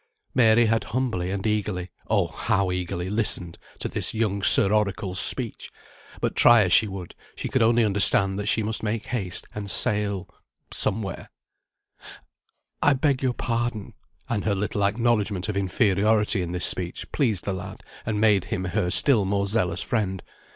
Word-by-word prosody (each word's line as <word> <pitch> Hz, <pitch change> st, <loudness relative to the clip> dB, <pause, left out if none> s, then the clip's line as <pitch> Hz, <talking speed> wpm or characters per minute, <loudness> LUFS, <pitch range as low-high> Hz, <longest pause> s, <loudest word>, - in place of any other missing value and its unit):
Mary 115 Hz, -2 st, +4 dB
had 115 Hz, 0 st, 0 dB
humbly 110 Hz, -7 st, -2 dB
and 95 Hz, +1 st, -4 dB
eagerly 105 Hz, -4 st, -2 dB, 0.2 s
(oh, -, -, +2 dB
how 95 Hz, -1 st, -1 dB
eagerly!) 90 Hz, 0 st, -4 dB
listened 95 Hz, -5 st, -1 dB, 0.2 s
to -, -, -4 dB
this -, -, -3 dB
young 105 Hz, -3 st, -1 dB
Sir 100 Hz, +1 st, +8 dB
Oracle's 100 Hz, -3 st, -1 dB
speech; 120 Hz, 0 st, 0 dB, 0.5 s
but -, -, -2 dB
try 120 Hz, -2 st, +6 dB
as 90 Hz, -, 0 dB
she 110 Hz, -, +5 dB
would, 95 Hz, -3 st, -8 dB, 0.2 s
she -, -, -5 dB
could -, -, 0 dB
only 115 Hz, 0 st, +3 dB
understand 100 Hz, -1 st, +2 dB
that 105 Hz, -, -4 dB
she 110 Hz, -, +1 dB
must 110 Hz, +1 st, -2 dB
make 110 Hz, 0 st, -3 dB
haste, 95 Hz, -8 st, -4 dB
and 105 Hz, -1 st, -6 dB
sail 100 Hz, 0 st, +1 dB, 0.5 s
somewhere 100 Hz, -1 st, -2 dB, 1.5 s
"I 145 Hz, -, +4 dB
beg 135 Hz, -1 st, 0 dB
your 130 Hz, -2 st, 0 dB
pardon," 115 Hz, -3 st, -3 dB, 0.3 s
(and 110 Hz, -3 st, -2 dB
her 105 Hz, -2 st, 0 dB
little 100 Hz, +1 st, -2 dB
acknowledgment 105 Hz, -2 st, 0 dB
of 105 Hz, -, -3 dB
inferiority 100 Hz, +1 st, +1 dB
in 85 Hz, -1 st, -4 dB
this 90 Hz, 0 st, +1 dB
speech 90 Hz, -1 st, -1 dB
pleased 115 Hz, -, 0 dB
the 100 Hz, -, -2 dB
lad, 90 Hz, -1 st, -8 dB, 0.2 s
and 110 Hz, -2 st, -2 dB
made 105 Hz, -4 st, +3 dB
him 95 Hz, -, -4 dB
her 90 Hz, -1 st, -1 dB
still 110 Hz, +4 st, +4 dB
more 100 Hz, +1 st, -1 dB
zealous 95 Hz, -4 st, -1 dB
friend). 100 Hz, -6 st, -2 dB
105 Hz, 165 wpm, -24 LUFS, 95-110 Hz, 1.5 s, Sir